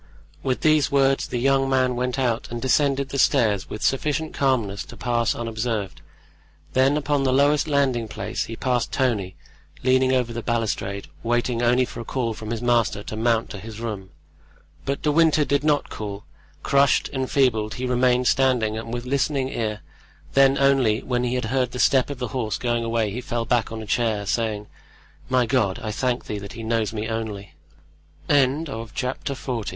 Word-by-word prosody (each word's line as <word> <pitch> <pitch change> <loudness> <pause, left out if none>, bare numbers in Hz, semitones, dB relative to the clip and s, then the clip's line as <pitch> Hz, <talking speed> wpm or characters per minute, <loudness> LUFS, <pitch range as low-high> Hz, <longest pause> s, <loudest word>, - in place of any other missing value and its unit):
With 130 -1 -1
these 155 -3 +3
words 135 -1 +2
the - - -3
young 135 +2 +2
man 130 -1 +2
went 125 +1 -1
out 120 -4 0
and 120 - -4
descended 140 +1 +1
the 140 - -3
stairs 105 -6 +2
with 105 - -6
sufficient 150 +3 0
calmness 115 -8 0
to - - -12
pass 120 -2 0
unobserved; 110 -3 -3 0.7
then 135 +3 +3
upon 145 -1 0
the 135 -1 +2
lowest 145 +3 +3
landing 135 -6 +1
place - - -4
he 115 - -7
passed 125 0 -1
Tony, 110 -8 0 0.5
leaning 130 0 +3
over 125 -2 +1
the 120 - -4
balustrade, 105 -4 -2
waiting 120 0 0
only 125 +2 +3
for 120 - -9
a - - -4
call 115 -1 -2
from 110 0 -8
his 115 +1 -3
master 120 -4 +1
to 110 - -6
mount 115 0 +1
to 100 - -6
his 110 +1 -9
room. 105 -5 -5 0.8
But 140 0 -2
De 150 - +2
Winter 155 -1 +4
did 140 0 +1
not 150 -1 +1
call; 105 -1 -6 0.4
crushed, 140 -1 +3
enfeebled, 130 -5 +1
he 130 - -3
remained 125 0 +2
standing 125 -5 +2
and 115 0 -7
with 120 0 -4
listening 135 0 0
ear; 110 -4 -3 0.5
then 135 0 +5
only 135 -5 +3
when 125 -1 -1
he 125 0 -1
had 125 - -1
heard 125 -2 0
the - - -4
step 130 +2 +3
of 145 - -5
the 125 -2 -4
horse 110 -4 -2
going 120 -1 -1
away 115 -2 0
he 120 +5 -4
fell 120 -3 -3
back 120 -1 +1
on 110 -1 -5
a - - -8
chair, 110 -2 0
saying: 105 0 -1 0.6
"My 125 -1 +3
God, 110 -7 +1
I 110 - -4
thank 125 +2 -1
Thee 105 - -4
that 100 0 -9
he 115 - -7
knows 110 -2 0
me 110 0 -3
only." 110 -3 -5 0.7
Chapter 135 -2 0
XLI. 120 -5 -4
120 Hz, 185 wpm, -23 LUFS, 110-135 Hz, 0.8 s, then